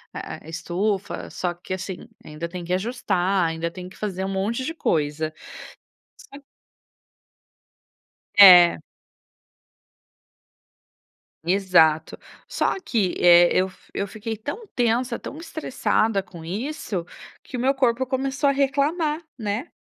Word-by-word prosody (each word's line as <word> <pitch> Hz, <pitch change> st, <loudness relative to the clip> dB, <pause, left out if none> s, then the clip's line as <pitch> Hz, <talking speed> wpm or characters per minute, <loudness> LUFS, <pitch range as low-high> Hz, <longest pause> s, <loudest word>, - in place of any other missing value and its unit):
eh, 160 Hz, -, -8 dB
estufa, 190 Hz, +4 st, -3 dB
só 175 Hz, -1 st, -3 dB
que 175 Hz, +2 st, -7 dB
assim, 185 Hz, 0 st, -6 dB, 0.2 s
ainda 155 Hz, +2 st, -6 dB
tem 175 Hz, 0 st, -7 dB
que 175 Hz, -, -7 dB
ajustar, 190 Hz, -3 st, 0 dB
ainda 165 Hz, +1 st, -2 dB
tem 180 Hz, +1 st, -9 dB
que -, -, -16 dB
fazer 190 Hz, -3 st, -3 dB
um 190 Hz, -, -2 dB
monte 205 Hz, +6 st, -2 dB
de 325 Hz, -, -3 dB
coisa. 155 Hz, -, -1 dB, 1.0 s
É. -, -, -9 dB, 2.0 s
É. 180 Hz, -, +9 dB, 2.7 s
Exato. 170 Hz, -4 st, +3 dB, 0.3 s
Só -, -, 0 dB
que, 205 Hz, -7 st, 0 dB
eh, 175 Hz, 0 st, +7 dB
eu 185 Hz, 0 st, +1 dB, 0.2 s
eu 200 Hz, -, -2 dB
fiquei 220 Hz, +2 st, -5 dB
tão 290 Hz, -, -6 dB
tensa, 240 Hz, +1 st, +1 dB
tão 295 Hz, -, -8 dB
estressada 225 Hz, -, -1 dB
com 170 Hz, -3 st, -12 dB
isso, 205 Hz, -, -4 dB, 0.4 s
que -, -, -9 dB
o -, -, -4 dB
meu 265 Hz, +2 st, +2 dB
corpo 260 Hz, -1 st, +1 dB
começou 270 Hz, +2 st, 0 dB
a -, -, +4 dB
reclamar, 295 Hz, +4 st, 0 dB, 0.2 s
né. 215 Hz, +6 st, -3 dB
200 Hz, 120 wpm, -23 LUFS, 175-255 Hz, 2.7 s, É